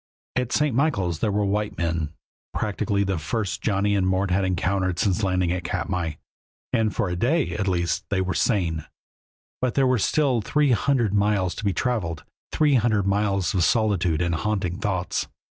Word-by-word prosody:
At 125 -1 -1
St. 150 -5 +1
Michaels 100 - +1
there 105 - +1
were 105 +1 +1
white 105 +1 -1
men, 85 -3 -1 0.4
practically 100 -1 0
the 95 -3 -1
first 100 +2 -2
Johnny 100 -1 +1
and 95 -2 +1
Mort 95 0 +1
had 95 +2 +2
encountered 95 0 0
since 95 +2 +1
landing 90 -3 +1
at 90 0 -2
Katmai, 85 -2 -2 0.6
and 110 -3 +2
for - - 0
a 90 - -2
day 140 - +1
at 100 -2 -2
least 85 -2 0
they 100 - 0
were 95 0 0
sane. 85 -8 0 0.8
But 125 -2 0
there 135 - +3
were 130 -2 +2
still 130 0 +2
three 145 +6 +2
hundred 120 -2 +2
miles 100 -3 +2
to - - -7
be 100 - +2
traveled, 95 - -2 0.3
three 150 -2 +3
hundred 110 -5 +2
miles 100 -3 +1
of 90 -3 +2
solitude 95 -7 +2
and 85 -1 0
haunting 95 0 -1
thoughts. 95 -5 -1
100 Hz, 175 wpm, -24 LUFS, 90-110 Hz, 0.8 s, there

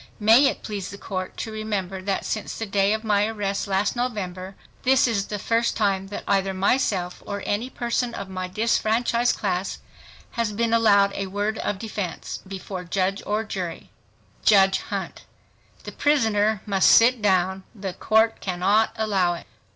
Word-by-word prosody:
May 225 +6 +6
it - - -3
please 205 -4 -5
the 200 - -8
Court 185 -2 -5
to 220 - -4
remember 200 -4 -3
that 195 0 -2
since 215 - -3
the 225 - -3
day 195 -1 +2
of 220 +1 -1
my 210 -1 +2
arrest 205 -2 -2
last 195 +3 0
November 195 -6 -4 0.3
this 260 0 +4
is 205 -4 -1
the 210 - -3
first 230 +3 0
time 195 -3 +1
that 200 - -6
either 195 -1 +1
myself 190 -3 0
or 200 -1 -5
any 220 +5 -1
person 240 -1 -2
of 200 - -6
my 185 -1 -4
disfranchised 230 +4 +1
class 190 -2 -2 0.5
has 230 -3 -2
been 230 +2 0
allowed 200 -3 +4
a 195 - -3
word 205 +3 -2
of 205 - -2
defense 200 -5 -5
before 190 -1 -6
judge 190 +2 -1
or 210 +2 0
jury 185 -6 -6 0.5
JUDGE 195 -2 +5
HUNT—The - - -9
prisoner 220 -8 +2
must 195 -2 +3
sit 235 +1 +6
down, 190 -1 +2
the 195 -3 -5
Court 220 +3 +2
cannot 195 +5 +1
allow 195 -6 +1
it. - - -10
205 Hz, 160 wpm, -24 LUFS, 190-220 Hz, 0.5 s, May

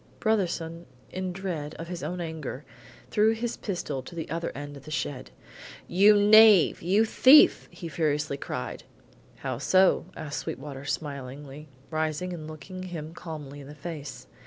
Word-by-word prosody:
Brotherson, 175 -6 -1 0.3
in 185 0 -3
dread 175 -5 -5
of 165 - -7
his 175 0 -6
own 180 0 -4
anger, 155 -4 -6 0.5
threw 215 +1 +4
his 230 +1 -3
pistol 160 -9 -4
to 170 - -11
the 165 - -4
other 165 +1 -2
end 145 0 -7
of 140 - -12
the - - -9
shed: 145 -3 -3 0.6
"You 205 +4 +6
knave! 210 -3 +7
You 195 +6 +3
thief!" 265 +6 +6
he 170 - -8
furiously 150 -2 -1
cried. - - -5 0.5
"How 130 -3 -4
so?" 185 +6 +4
asked 150 -1 -4
Sweetwater 135 0 -6
smilingly, 140 0 -6 0.2
rising 155 +3 -2
and 155 -3 -7
looking 155 +4 -9
him 165 -4 -6
calmly 150 -5 -8
in 135 - -11
the 145 - -10
face. 150 -2 -7
160 Hz, 155 wpm, -27 LUFS, 145-185 Hz, 0.6 s, knave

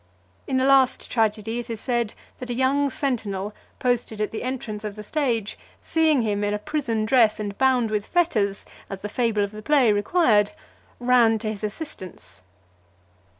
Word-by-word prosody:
In 265 - 0
the 260 - +2
last 270 -1 +3
tragedy, 225 0 0
it 240 0 -7
is 225 -2 -4
said 240 -3 -1 0.2
that 250 - -7
a 240 - -1
young 275 +3 +2
sentinel, 215 -8 -2 0.2
posted 245 -3 -1
at 210 - -1
the 220 - -5
entrance 235 -5 -4
of 210 -1 -5
the 210 - -8
stage, 235 -5 -1 0.2
seeing 315 -6 +2
him 205 -2 -1
in 205 0 0
a - - -1
prison 235 -3 -2
dress 225 -2 +4
and 205 -1 -4
bound 255 -4 +3
with 210 -1 -1
fetters, 215 - 0 0.2
as 195 -1 -7
the 210 - -3
fable 225 -2 +1
of 200 - -3
the 215 0 -9
play 255 -3 +4
required, 205 - +3 0.5
ran 245 -2 +4
to 215 0 -3
his 215 -1 -8
assistance. 210 - -7
225 Hz, 175 wpm, -24 LUFS, 210-260 Hz, 0.5 s, dress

